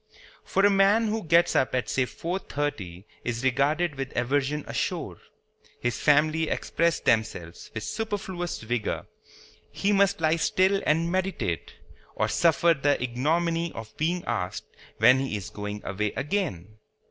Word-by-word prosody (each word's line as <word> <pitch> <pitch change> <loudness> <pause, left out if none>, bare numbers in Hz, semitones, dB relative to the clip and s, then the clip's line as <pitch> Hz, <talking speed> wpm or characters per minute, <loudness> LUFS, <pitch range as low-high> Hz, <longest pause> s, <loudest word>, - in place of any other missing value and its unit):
For 195 - +2
a - - +7
man 200 +3 +4
who 220 +1 -2
gets 170 +1 +3
up 130 - +2
at 125 - -1
say 130 - +1
four 175 +8 -4
thirty 100 - -4 0.2
is 120 0 -3
regarded 145 +6 +1
with 135 0 -5
aversion 140 +4 0
ashore. - - -3 0.6
His 120 -2 -2
family 155 +2 +3
express 170 -2 0
themselves 90 -7 -1
with 110 - -3
superfluous 190 - -4
vigor. 115 0 -2 0.7
He 200 - 0
must 200 -1 +3
lie 160 0 +2
still 190 +4 +2
and 165 +3 +2
meditate, 185 - -2 0.4
or - - +1
suffer 170 0 +4
the 145 -1 +1
ignominy 165 +7 0
of 110 -1 -9
being 175 +3 -1
asked 90 +1 -3 0.3
when 130 +1 +6
he 135 -6 -2
is 105 +1 -8
going 105 0 -6
away 105 +2 -2
again. 135 - -3
150 Hz, 145 wpm, -26 LUFS, 120-175 Hz, 0.7 s, a